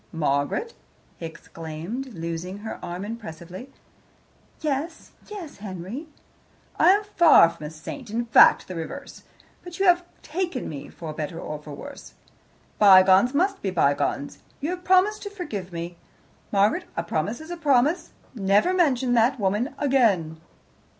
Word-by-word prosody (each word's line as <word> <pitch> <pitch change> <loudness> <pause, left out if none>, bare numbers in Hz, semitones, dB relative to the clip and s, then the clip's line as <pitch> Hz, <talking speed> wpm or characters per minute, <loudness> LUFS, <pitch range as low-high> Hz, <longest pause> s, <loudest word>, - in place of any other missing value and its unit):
"Margaret!" 150 - -1 0.4
he 165 - -5
exclaimed, 165 +10 -7
loosing 170 +3 -5
her 220 - -5
arm 175 +3 -5
impressively. 190 0 -8 0.9
"Yes 310 +2 -3 0.2
yes, 390 -8 -8
Henry?" 200 - -7 0.7
"I - - +6
am 405 +3 +4
far 340 - +6
from 160 -3 -8
a - - -6
saint 160 - -9
in 235 +3 -2
fact, 230 - +6
the 185 - -6
reverse 180 - -7 0.4
but 350 -1 -9
you 390 - +1
have 355 -1 +5 0.2
taken 345 -4 -3
me, 140 -3 -7
for 160 -2 -8
better 155 +2 -5
or 150 - -6
worse. 150 - -10 0.6
Bygones 195 +4 +7
must 385 +5 +1
be 195 - -1
bygones. 145 -4 0 0.2
You 295 +5 -2
have 360 0 -5
promised 380 +4 +3
to 405 - -5
forgive 220 - -6
me. 170 0 -6 0.5
Margaret, 200 +1 +2
a 170 - 0
promise 170 +7 -2
is 315 +2 -10
a - - -3
promise. 305 +2 +2 0.2
Never 205 - +2
mention 265 -9 +2
that 240 +3 +3
woman 210 +7 0
again." 200 - +1
220 Hz, 145 wpm, -25 LUFS, -, 0.9 s, Bygones